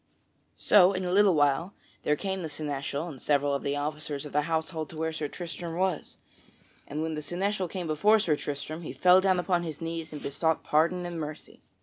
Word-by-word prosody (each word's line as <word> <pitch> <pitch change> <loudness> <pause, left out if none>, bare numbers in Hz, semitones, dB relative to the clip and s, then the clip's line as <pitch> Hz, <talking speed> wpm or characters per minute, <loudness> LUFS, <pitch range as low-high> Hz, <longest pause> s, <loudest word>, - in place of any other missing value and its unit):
So, 195 -2 +6
in 185 -1 -2
a 180 - -1
little 195 -1 +5
while, 145 +6 +2 0.3
there 150 - +2
came 190 +3 -3
the 160 - -4
seneschal 145 +1 -3
and 140 -7 -9
several 145 -1 +2
of 140 - -1
the 140 - -1
officers 150 0 -3
of 145 - -9
the 150 - +3
household 160 -1 -2
to 160 - -9
where 160 0 -1
Sir 155 -1 -3
Tristram 170 +1 -6
was, 185 -4 -1 0.7
and 150 +2 -3
when 160 0 -2
the 150 - -3
seneschal 185 +5 -1
came 180 0 -5
before 165 +8 +4
Sir 175 -8 +2
Tristram, 145 +3 -5
he 160 - -6
fell 180 +1 +6
down 185 -1 +3
upon 180 -1 +1
his 160 -3 -5
knees 165 -1 -4
and 150 - -6
besought 160 +4 0
pardon 170 +4 +2
and 170 -1 -4
mercy. 150 -1 -7
160 Hz, 210 wpm, -28 LUFS, 150-180 Hz, 0.7 s, So